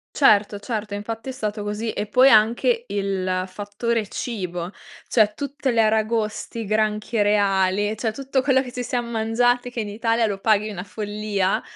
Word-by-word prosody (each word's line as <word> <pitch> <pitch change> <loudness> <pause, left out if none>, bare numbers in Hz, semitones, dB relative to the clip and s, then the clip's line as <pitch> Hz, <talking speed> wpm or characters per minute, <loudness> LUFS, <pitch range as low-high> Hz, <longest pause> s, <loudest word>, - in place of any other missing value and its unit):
Certo, 210 -6 +4
certo, 210 -1 -4
infatti 225 +4 -5
è - - -2
stato 215 -4 -4
così, 210 +2 -3
e 210 - -3
poi 255 +5 +6
anche 250 - +3
il 185 -2 -1
fattore 205 +3 -3
cibo, 180 -7 -4 0.3
cioè 215 -3 +3
tutte 280 0 -3
le 235 -2 +2
aragoste, 220 +1 0
i - - -3
granchi 215 +1 0
reali, 205 0 +2
cioè 225 +1 -1
tutto 270 +1 -1
quello 265 -1 +3
che 250 - -9
ci 250 - -4
siam 245 0 -2
mangiati 245 +2 +1
che 245 - -4
in 210 - -3
Italia 230 +2 +1
lo 200 -2 -3
paghi 215 +1 +2
una 185 -4 -5
follia, 205 -1 -2
215 Hz, 170 wpm, -23 LUFS, 205-235 Hz, 0.3 s, poi